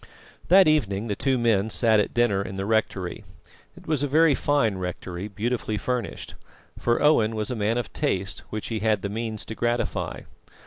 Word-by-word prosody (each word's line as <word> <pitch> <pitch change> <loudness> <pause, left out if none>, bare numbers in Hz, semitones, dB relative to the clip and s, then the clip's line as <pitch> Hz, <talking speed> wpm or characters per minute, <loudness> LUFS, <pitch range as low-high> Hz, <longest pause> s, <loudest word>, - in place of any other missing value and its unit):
That 190 0 +7
evening 115 -8 +1
the 100 - 0
two 135 +3 +1
men 110 -3 +2
sat 110 -1 +3
at 105 - 0
dinner 120 -5 +2
in 95 -1 -6
the 95 - -2
rectory. 100 -4 -1 0.5
It - - -14
was 155 -4 0
a 145 - +1
very 155 +2 +4
fine 130 -9 +1
rectory, 90 +1 -5
beautifully 110 +1 -2
furnished; 125 +2 -3 0.5
for 120 0 +1
Owen 115 -7 +4
was 110 +2 -3
a - - -2
man 110 +2 0
of 120 -4 -4
taste 100 -9 -2
which 110 -1 -5
he 115 -2 -2
had 105 -2 +1
the 100 - -2
means 110 0 -4
to - - -6
gratify. 120 +1 -2
110 Hz, 185 wpm, -25 LUFS, 100-125 Hz, 0.5 s, That